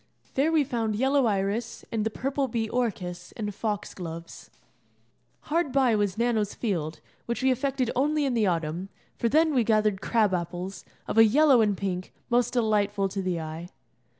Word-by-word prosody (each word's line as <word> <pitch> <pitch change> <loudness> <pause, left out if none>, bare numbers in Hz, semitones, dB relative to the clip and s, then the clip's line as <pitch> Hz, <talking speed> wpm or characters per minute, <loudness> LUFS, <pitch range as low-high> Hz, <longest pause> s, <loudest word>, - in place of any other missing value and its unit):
There 285 +4 +2
we 315 -2 +4
found 230 -5 -1
yellow 265 +2 +3
iris, 205 +3 -2
and 225 -2 0
the 220 - 0
purple 270 +4 -1
bee 225 -2 -1
orchis, 180 -7 -3
and 210 -2 -3
fox 210 0 -3
gloves. 170 -2 -8 0.9
Hard 330 -2 0
by 255 -4 +3
was 205 -2 0
Nano's 225 -3 0
Field, 165 -8 -2 0.3
which 235 +2 -2
we 265 - +4
affected 260 -1 0
only 295 +3 +2
in 265 - 0
the 220 -4 +2
autumn, 170 +2 -2 0.3
for 235 - 0
then 315 +3 +3
we 250 -3 +3
gathered 215 -3 +2
crab 215 -5 +2
apples, 180 +2 -4 0.2
of 225 - +1
a - - +10
yellow 265 +2 +5
and 205 -3 +2
pink, 185 -2 -3 0.2
most 245 0 +2
delightful 205 -4 +1
to 195 0 -3
the 180 -2 -1
eye. 160 +2 -6
220 Hz, 175 wpm, -27 LUFS, 190-250 Hz, 0.9 s, a